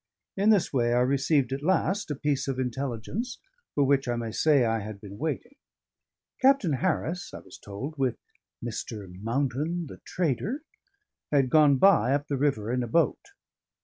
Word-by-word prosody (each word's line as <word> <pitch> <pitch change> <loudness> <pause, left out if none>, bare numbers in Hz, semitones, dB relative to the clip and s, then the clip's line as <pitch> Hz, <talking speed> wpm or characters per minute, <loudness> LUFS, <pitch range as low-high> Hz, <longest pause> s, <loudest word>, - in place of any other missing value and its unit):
In 200 +2 +2
this 205 -8 +3
way 120 -2 +2
I 125 - +3
received 135 0 +2
at 135 - -3
last 190 +4 +1
a 150 - -2
piece 140 0 -1
of 135 -2 -2
intelligence 130 - -3 0.4
for 145 - +3
which, 135 -1 +2
I 120 - 0
may 115 -1 -3
say, 145 0 +3
I 115 0 +1
had 105 -1 -7
been 100 0 -10
waiting. 160 - -3 0.9
Captain 260 - +4
Harris 175 +3 -1
(I - - -7
was - - -14
told) 135 +10 -7
with 130 -3 +1 0.5
"Mr. 110 -3 -5
Mountain, 140 +8 -1
the 140 - -10
trader," 180 - -2 0.7
had 135 -4 +2
gone 150 -3 +6
by 140 -6 +5
up 145 +1 -3
the 140 - 0
river 130 -6 0
in 125 - 0
a 120 - -2
boat. 165 +8 +2
140 Hz, 170 wpm, -27 LUFS, 120-160 Hz, 0.9 s, gone